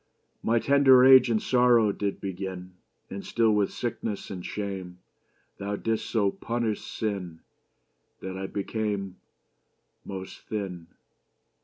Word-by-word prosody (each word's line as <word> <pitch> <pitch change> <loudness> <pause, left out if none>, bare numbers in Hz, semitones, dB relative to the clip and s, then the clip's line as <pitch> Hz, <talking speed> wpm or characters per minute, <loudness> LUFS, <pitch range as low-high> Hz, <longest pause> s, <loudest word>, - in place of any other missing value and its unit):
My 115 +1 +2
tender 135 0 +6
age 130 -2 +8
in 110 -2 +2
sorrow 120 -4 +4
did 100 0 -3
beginne 95 -1 -6 0.4
And 100 0 -6
still 115 -1 +2
with 105 -2 +1
sicknesses 115 -3 -4
and 90 -2 -6
shame. 95 -3 -5 0.6
Thou 100 +1 -3
didst 110 +1 -2
so 100 -4 +2
punish 115 -1 -2
sinne, 95 -7 -4 0.8
That 95 0 -6
I 95 0 -4
became 100 -2 -3 0.9
Most 95 -1 -7
thinne. 95 -6 -4
105 Hz, 120 wpm, -27 LUFS, 95-115 Hz, 0.9 s, age